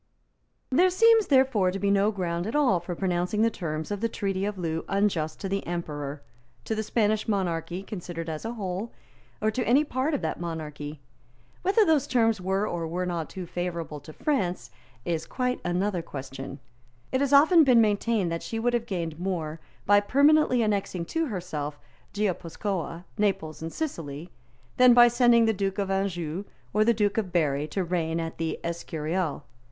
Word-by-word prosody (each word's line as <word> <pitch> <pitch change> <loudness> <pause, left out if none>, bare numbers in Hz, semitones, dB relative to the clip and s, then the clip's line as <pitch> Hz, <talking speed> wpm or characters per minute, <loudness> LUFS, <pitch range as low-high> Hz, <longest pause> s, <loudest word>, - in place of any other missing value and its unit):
There 355 +8 +5
seems, 450 +3 +5
therefore, 260 -9 +4
to 185 - -3
be 200 +1 +1
no 200 +1 +3
ground 175 -2 -2
at 225 - -3
all 260 -12 +3
for 175 +1 -5
pronouncing 180 +3 0
the 230 - +3
terms 155 -3 -4
of 205 0 -3
the 230 - +1
Treaty 195 -2 -2
of 205 -1 -3
Loo 165 -2 -2
unjust 195 -6 0
to 195 - -2
the 195 +1 -2
Emperor, 150 -4 -4 0.4
to - - -1
the 220 - -1
Spanish 215 0 +1
monarchy 180 -3 -1
considered 175 -4 -6
as 155 -1 -4
a 225 +1 -3
whole, 200 0 -4 0.5
or 215 - +3
to 250 +3 -1
any 265 +6 +4
part 285 +1 -1
of - - -2
that - - -2
monarchy. 150 -3 -6 0.6
Whether 405 +4 +4
those 315 -6 +3
terms 225 -5 +2
were 190 +3 0
or 170 -4 -3
were 180 +3 -2
not 170 -3 -3
too 185 -2 -6
favourable 170 -3 -4
to 155 - -12
France 180 - -1 0.3
is 165 -1 -2
quite 250 -1 -1
another 180 +1 0
question. 135 -2 -7 0.5
It 260 - +1
has 280 -1 +1
often 315 +4 +7
been 250 -4 +5
maintained 210 -3 +2
that 165 - -2
she 225 - -5
would 240 +2 +1
have 235 -1 0
gained 170 -6 -3
more 165 -4 -3 0.3
by 205 +1 +6
permanently 280 +2 +4
annexing 200 -5 -1
to 325 -1 +1
herself 160 - -4 0.4
Guipuscoa, 185 -3 -2 0.2
Naples 175 -7 0
and 165 0 -4
Sicily 165 - -5 0.5
than 250 -1 +7
by 240 0 +9
sending 240 -1 +5
the 220 - +3
Duke 195 -1 -2
of 195 -1 -1
Anjou 190 -2 -2 0.3
or 215 - +4
the 235 - +4
Duke 205 0 +1
of 195 -5 -3
Berry 150 -4 +1
to 185 +5 -2
reign 170 -2 -1
at 165 0 -5
the 160 -1 -2
Escurial. 165 -1 -3
190 Hz, 180 wpm, -27 LUFS, 165-225 Hz, 0.6 s, by